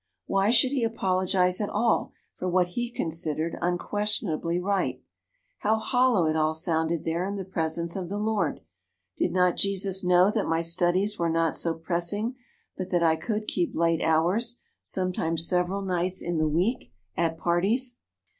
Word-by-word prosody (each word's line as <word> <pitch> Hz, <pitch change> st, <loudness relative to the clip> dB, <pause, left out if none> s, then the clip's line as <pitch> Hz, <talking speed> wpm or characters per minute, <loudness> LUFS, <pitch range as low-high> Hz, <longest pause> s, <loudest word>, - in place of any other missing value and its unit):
Why 195 Hz, +1 st, +1 dB
should 250 Hz, +2 st, +4 dB
he 270 Hz, -4 st, 0 dB
apologize 185 Hz, -4 st, +1 dB
at 205 Hz, -, -1 dB
all 225 Hz, +2 st, +1 dB, 0.2 s
for 185 Hz, -, -3 dB
what 180 Hz, 0 st, +2 dB
he 240 Hz, +6 st, -3 dB
considered 160 Hz, -5 st, -2 dB
unquestionably 175 Hz, -2 st, -1 dB
right? 195 Hz, +1 st, -1 dB, 0.6 s
How 215 Hz, +1 st, +2 dB
hollow 245 Hz, -5 st, +2 dB
it 155 Hz, 0 st, +1 dB
all 155 Hz, 0 st, +1 dB
sounded 160 Hz, -1 st, 0 dB
there 165 Hz, +2 st, -1 dB
in 200 Hz, +2 st, -3 dB
the 195 Hz, -2 st, -5 dB
presence 170 Hz, -2 st, -2 dB
of 185 Hz, -3 st, -4 dB
the 200 Hz, -, -3 dB
Lord! 215 Hz, 0 st, -1 dB, 0.5 s
Did -, -, 0 dB
not 180 Hz, -1 st, +2 dB
Jesus 195 Hz, -1 st, +1 dB
know 180 Hz, +2 st, +5 dB
that 215 Hz, -2 st, -1 dB
my 165 Hz, 0 st, +1 dB
studies 175 Hz, +5 st, +1 dB
were 170 Hz, -1 st, +1 dB
not 165 Hz, 0 st, +1 dB
so 165 Hz, -1 st, 0 dB
pressing 175 Hz, +8 st, -1 dB, 0.4 s
but 185 Hz, 0 st, -5 dB
that 175 Hz, -2 st, +1 dB
I 160 Hz, -1 st, +4 dB
could 215 Hz, +6 st, -3 dB
keep 175 Hz, -2 st, -1 dB
late 165 Hz, -1 st, +1 dB
hours, 185 Hz, +10 st, +2 dB, 0.2 s
sometimes 165 Hz, -3 st, -1 dB
several 180 Hz, +2 st, 0 dB
nights 185 Hz, 0 st, -1 dB
in 170 Hz, -2 st, -1 dB
the 155 Hz, 0 st, +2 dB
week, 180 Hz, +11 st, -1 dB, 0.2 s
at 165 Hz, -1 st, 0 dB
parties? 210 Hz, +10 st, 0 dB
180 Hz, 165 wpm, -26 LUFS, 165-205 Hz, 0.6 s, know